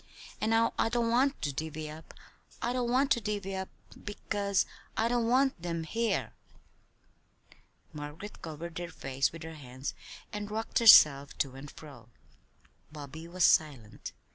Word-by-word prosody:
And 215 Hz, -, +1 dB
now 225 Hz, 0 st, +3 dB
I -, -, +3 dB
don't 235 Hz, 0 st, +1 dB
want 270 Hz, +4 st, +2 dB
to 145 Hz, -2 st, -1 dB
divvy 155 Hz, +2 st, -4 dB
up, 155 Hz, +1 st, -11 dB, 0.4 s
I 240 Hz, -, -1 dB
don't 250 Hz, -1 st, -1 dB
want 270 Hz, +3 st, +2 dB
to 235 Hz, -, +3 dB
divvy 200 Hz, -2 st, -3 dB
up, 190 Hz, 0 st, -4 dB, 0.3 s
because 205 Hz, -1 st, -1 dB, 0.3 s
I 225 Hz, -, +2 dB
don't 235 Hz, -1 st, +1 dB
want 260 Hz, -4 st, +2 dB
them 170 Hz, -1 st, -3 dB
here!" 230 Hz, +7 st, -1 dB, 1.6 s
Margaret 150 Hz, +7 st, -8 dB
covered 165 Hz, +1 st, -6 dB
her 175 Hz, -1 st, -5 dB
face 135 Hz, -4 st, -1 dB
with 165 Hz, 0 st, -9 dB
her 160 Hz, 0 st, -7 dB
hands 130 Hz, -2 st, -6 dB, 0.4 s
and 210 Hz, 0 st, -4 dB
rocked 220 Hz, +2 st, -1 dB
herself 145 Hz, -11 st, +8 dB
to 135 Hz, -3 st, -1 dB
and 135 Hz, +2 st, -9 dB
fro. 135 Hz, -8 st, -13 dB, 0.8 s
Bobby 150 Hz, +2 st, -9 dB
was 180 Hz, +1 st, +2 dB
silent. 135 Hz, -9 st, +1 dB
170 Hz, 150 wpm, -30 LUFS, 150-225 Hz, 1.6 s, herself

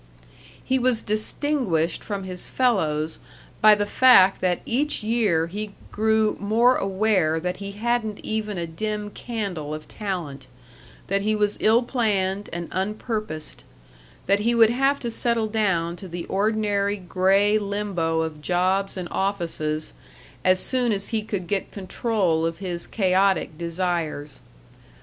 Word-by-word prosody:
He 260 Hz, 0 st, +1 dB
was 250 Hz, -2 st, +2 dB
distinguished 215 Hz, -, -1 dB
from 200 Hz, -2 st, -4 dB
his 185 Hz, -1 st, -6 dB
fellows 160 Hz, -11 st, 0 dB, 0.4 s
by 215 Hz, 0 st, +8 dB
the 205 Hz, 0 st, -1 dB
fact 205 Hz, -4 st, +6 dB
that 180 Hz, -1 st, +1 dB
each 280 Hz, 0 st, 0 dB
year 210 Hz, -8 st, +2 dB
he 205 Hz, +4 st, -6 dB, 0.2 s
grew 220 Hz, 0 st, +2 dB
more 230 Hz, +5 st, +3 dB
aware 190 Hz, -6 st, +1 dB
that 180 Hz, +2 st, -3 dB
he 200 Hz, 0 st, -7 dB
hadn't 220 Hz, 0 st, -1 dB
even 215 Hz, -2 st, -2 dB
a 170 Hz, -, -2 dB
dim 210 Hz, +5 st, -4 dB
candle 195 Hz, -12 st, -4 dB
of 155 Hz, 0 st, -10 dB
talent; 165 Hz, -10 st, -5 dB, 0.6 s
that 195 Hz, +1 st, 0 dB
he 215 Hz, +2 st, +1 dB
was 210 Hz, -1 st, +1 dB
ill 225 Hz, +3 st, +4 dB
planned 205 Hz, -5 st, 0 dB
and 170 Hz, -1 st, -4 dB
unpurposed; 210 Hz, -4 st, -3 dB, 0.6 s
that 200 Hz, +2 st, +3 dB
he 235 Hz, +3 st, +1 dB
would 225 Hz, -1 st, +6 dB
have 270 Hz, +3 st, +2 dB
to 235 Hz, -, -3 dB
settle 230 Hz, -1 st, +1 dB
down 190 Hz, -6 st, 0 dB
to 190 Hz, -, -9 dB
the 175 Hz, 0 st, -6 dB
ordinary 205 Hz, 0 st, 0 dB
gray 195 Hz, +3 st, +2 dB
limbo 200 Hz, -6 st, -1 dB
of 160 Hz, -2 st, -4 dB
jobs 185 Hz, +4 st, 0 dB
and 180 Hz, -1 st, -4 dB
offices 165 Hz, -6 st, -2 dB, 0.5 s
as 185 Hz, 0 st, +4 dB
soon 250 Hz, 0 st, +1 dB
as 200 Hz, -1 st, -2 dB
he 225 Hz, -2 st, 0 dB
could 205 Hz, -4 st, -4 dB
get 195 Hz, +2 st, -2 dB
control 190 Hz, -4 st, 0 dB
of 165 Hz, 0 st, -1 dB
his 175 Hz, -2 st, -4 dB
chaotic 190 Hz, -4 st, +1 dB
desires. 170 Hz, -3 st, -3 dB
200 Hz, 140 wpm, -24 LUFS, 175-215 Hz, 0.6 s, by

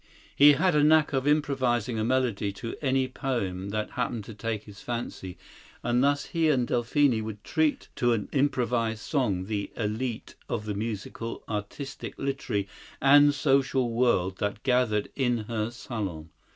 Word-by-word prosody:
He 145 Hz, +1 st, +8 dB
had 180 Hz, +5 st, +2 dB
a 150 Hz, -1 st, +4 dB
knack 155 Hz, 0 st, +4 dB
of 135 Hz, +1 st, 0 dB
improvising 130 Hz, -6 st, +1 dB
a -, -, 0 dB
melody 120 Hz, -4 st, 0 dB
to 115 Hz, +3 st, -6 dB
any 135 Hz, -2 st, +1 dB
poem 100 Hz, -8 st, -3 dB
that 105 Hz, +1 st, -3 dB
happened 120 Hz, -3 st, -2 dB
to 110 Hz, -, -9 dB
take 110 Hz, 0 st, -3 dB
his 100 Hz, -1 st, -13 dB
fancy, 115 Hz, -6 st, -5 dB, 0.5 s
and 120 Hz, +1 st, +2 dB
thus 145 Hz, 0 st, +2 dB
he 165 Hz, -2 st, +1 dB
and 130 Hz, -5 st, +2 dB
Delphine 120 Hz, 0 st, +2 dB
would 105 Hz, -1 st, -7 dB
treat 155 Hz, -2 st, 0 dB
to 120 Hz, -1 st, +3 dB
an 110 Hz, -3 st, -2 dB
improvised 120 Hz, -5 st, 0 dB
song 105 Hz, -, 0 dB
the 100 Hz, -1 st, -3 dB
elite 110 Hz, +2 st, -3 dB, 0.2 s
of 110 Hz, -2 st, -2 dB
the 105 Hz, -, -2 dB
musical, 110 Hz, +2 st, -5 dB
artistic, 115 Hz, +6 st, -5 dB
literary 130 Hz, -7 st, -2 dB, 0.3 s
and 145 Hz, +1 st, +6 dB
social 135 Hz, -3 st, +2 dB
world 115 Hz, -6 st, +1 dB
that 105 Hz, +1 st, -2 dB
gathered 125 Hz, -5 st, +2 dB
in 125 Hz, -3 st, +1 dB
her 110 Hz, -1 st, -1 dB
salon. 100 Hz, -10 st, -6 dB
120 Hz, 155 wpm, -27 LUFS, 105-135 Hz, 0.5 s, He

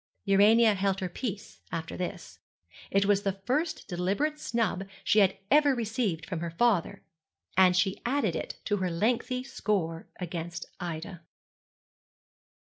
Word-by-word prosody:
Urania 215 Hz, +3 st, +6 dB
held 195 Hz, -1 st, 0 dB
her 185 Hz, -, -2 dB
peace 215 Hz, 0 st, -6 dB
after 165 Hz, -1 st, -4 dB
this. 180 Hz, -, -6 dB, 0.5 s
It 200 Hz, 0 st, +2 dB
was 200 Hz, 0 st, +3 dB
the 195 Hz, -1 st, -2 dB
first 300 Hz, +7 st, -1 dB
deliberate 205 Hz, -, -1 dB
snub 220 Hz, -7 st, -1 dB, 0.2 s
she 215 Hz, -, +4 dB
had 195 Hz, -1 st, +4 dB
ever 290 Hz, -1 st, +5 dB
received 220 Hz, -8 st, -1 dB
from 180 Hz, -2 st, -4 dB
her 170 Hz, 0 st, -3 dB
father, 195 Hz, +1 st, +1 dB, 0.5 s
and 180 Hz, 0 st, +5 dB
she 190 Hz, +2 st, +1 dB
added 240 Hz, -, 0 dB
it -, -, -4 dB
to 205 Hz, -, +1 dB
her 185 Hz, -2 st, -1 dB
lengthy 245 Hz, +8 st, 0 dB
score 190 Hz, -10 st, -2 dB
against 175 Hz, -1 st, -5 dB
Ida. 170 Hz, 0 st, -5 dB
195 Hz, 135 wpm, -29 LUFS, 180-230 Hz, 0.5 s, Urania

